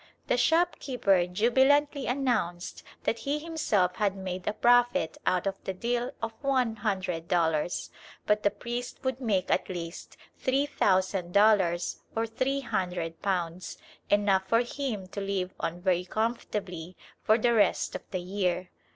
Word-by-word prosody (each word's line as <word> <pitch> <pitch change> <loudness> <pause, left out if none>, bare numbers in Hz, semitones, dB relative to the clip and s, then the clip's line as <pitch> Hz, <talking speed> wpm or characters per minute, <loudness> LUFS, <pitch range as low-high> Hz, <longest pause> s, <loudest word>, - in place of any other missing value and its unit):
The - - +2
shopkeeper 255 - +2
jubilantly 265 +8 +3
announced 235 -10 -1 0.2
that 230 - 0
he 285 +2 -1
himself 295 - 0
had 200 -2 +1
made 185 -1 -5
a 210 - +1
profit 245 -8 +3
out 185 0 +2
of 195 0 -3
the 190 - -4
deal 240 +4 -1
of 225 0 -2
one 255 -5 +1
hundred 190 -6 -2
dollars, 165 -1 0 0.3
but 210 0 +2
that 205 0 +1
the - - -29
priest 240 +2 -5
would 260 0 -2
make 205 -7 0
at - - +1
least 170 -2 -7 0.2
three 270 +2 +1
thousand 190 -8 +1
dollars 195 -5 +3 0.2
or 225 0 +1
three 260 +5 -1
hundred 180 -8 -3
pounds, 180 -2 -2 0.3
enough 200 -2 +3
for 230 +3 +4
him 240 -5 -3
to 200 - -5
live 195 -2 -2
on 165 +1 -3
very 180 -1 +1
comfortably 190 -5 -3 0.2
for 220 - +4
the 235 +1 +2
rest 215 -3 +2
of - - -4
the 185 - -3
year. 180 -1 -2
205 Hz, 150 wpm, -28 LUFS, 180-245 Hz, 0.3 s, for